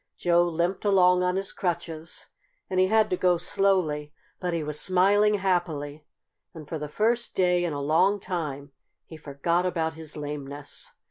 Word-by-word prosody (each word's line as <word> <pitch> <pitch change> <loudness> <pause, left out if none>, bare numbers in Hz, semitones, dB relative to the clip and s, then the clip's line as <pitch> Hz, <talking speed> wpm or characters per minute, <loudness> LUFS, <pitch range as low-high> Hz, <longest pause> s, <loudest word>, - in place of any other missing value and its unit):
Joe 175 -1 +3
limped 175 +2 -1
along 180 -3 +4
on 180 0 +1
his 195 0 -2
crutches, 165 -2 -4 0.5
and 185 - +1
he 185 - +4
had 220 +1 +3
to 180 - +1
go 180 -1 +3
slowly. 170 -5 +1 0.3
But 180 -1 -2
he 165 -2 -2
was 150 0 -1
smiling 200 +3 +3
happily, 155 -6 -2 0.5
and 155 -3 -10
for 160 0 -4
the 150 - -4
first 230 +8 0
day 180 -1 +2
in 175 - -1
a 145 - -3
long 165 +8 +2
time 150 -7 -4 0.3
he 160 - -11
forgot 155 +3 -1
about 165 -3 -1
his 160 -1 -8
lameness. 145 -1 -6
175 Hz, 170 wpm, -26 LUFS, 150-185 Hz, 0.5 s, along